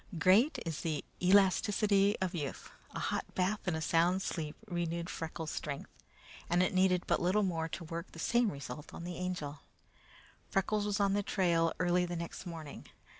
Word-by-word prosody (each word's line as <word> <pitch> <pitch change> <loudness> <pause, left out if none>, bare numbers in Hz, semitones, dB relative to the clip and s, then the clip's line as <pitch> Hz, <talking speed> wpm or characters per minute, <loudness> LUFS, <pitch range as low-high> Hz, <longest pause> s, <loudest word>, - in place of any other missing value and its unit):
Great 200 - +5
is 165 -3 -3
the 155 -3 -2 0.2
elasticity 200 +2 +4
of 185 -2 -1
youth. 145 -6 -5 0.2
A - - -2
hot - - -1
bath 190 +3 +1
and 175 - +1
a - - -4
sound 165 +3 +3
night's 190 - -3
sleep 155 -3 -3
renewed 170 -2 -2
Freckles' 160 -1 -5
strength, 140 -2 -5 0.6
and 175 +1 +4
it 185 - 0
needed 185 -1 +3
but - - +1
little 190 +4 +3
more 165 -4 -1
to 170 - -5
work 165 +2 -6
the - - -12
same 235 +5 +2
result 140 0 -7
with - - -7
the 175 0 -5
Angel. 180 -6 -3 0.9
Freckles 205 +2 +1
was 205 0 0
on 200 -1 +3
the 205 - +2
trail 170 -5 +2
early 180 0 +3
the 175 - -4
next 170 +2 -6
morning. 160 -4 -8
180 Hz, 180 wpm, -33 LUFS, 165-195 Hz, 0.9 s, Great